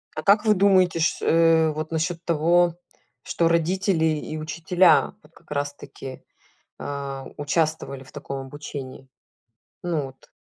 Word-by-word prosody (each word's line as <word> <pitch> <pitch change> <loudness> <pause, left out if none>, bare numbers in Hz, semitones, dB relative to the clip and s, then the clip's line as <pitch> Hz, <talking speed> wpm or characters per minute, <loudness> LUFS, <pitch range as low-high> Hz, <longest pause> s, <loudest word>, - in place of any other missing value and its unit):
А 155 - -4
как 210 +4 +4
вы 215 - +5
думаете, 185 -3 +3
ш 160 - 0
э, 165 -1 +4
вот 155 +1 -5
насчет 165 +1 -2
того, 170 +1 +3 0.5
что 170 - 0
родители 170 +1 +1
и 155 0 -2
учителя 165 +3 +3
вот 150 - -21
как 160 - -22
раз 145 0 -2
таки, 135 -2 -10 0.6
э, 140 -1 -5
участвовали 145 -2 -1
в 130 - -17
таком 135 0 -6
обучении? 135 -2 -8 0.8
Ну 170 -4 -1
вот 135 0 -16
160 Hz, 140 wpm, -24 LUFS, 145-170 Hz, 0.8 s, вы